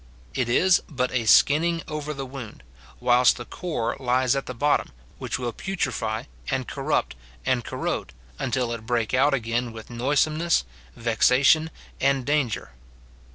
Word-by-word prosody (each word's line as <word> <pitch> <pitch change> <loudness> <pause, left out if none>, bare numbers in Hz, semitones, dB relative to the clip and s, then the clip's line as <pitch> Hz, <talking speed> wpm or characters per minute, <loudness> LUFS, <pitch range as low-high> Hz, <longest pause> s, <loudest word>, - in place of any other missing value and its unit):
It 125 -2 -1
is 180 +9 +4
but 125 -4 -1
a 120 -3 -1
skinning 165 +7 +4
over 150 -1 -4
the 135 -2 -5
wound, 125 - -9 0.4
whilst 125 0 +4
the 120 - -7
core 155 -9 -3
lies 130 0 +2
at 135 - -3
the 125 - -5
bottom, 145 +5 +1 0.3
which - - -3
will 120 -2 -3
putrefy, 125 - -2 0.3
and - - -1
corrupt, - - -1 0.3
and - - +1
corrode, - - -3 0.3
until 125 -2 -1
it 110 -1 -7
break 120 -2 0
out 140 +2 +4
again 120 0 -2
with 115 +1 -10
noisomeness, 150 - +1 0.3
vexation, 125 +7 +3 0.3
and 135 -2 +2
danger. 145 -6 0
130 Hz, 145 wpm, -25 LUFS, 120-145 Hz, 0.4 s, is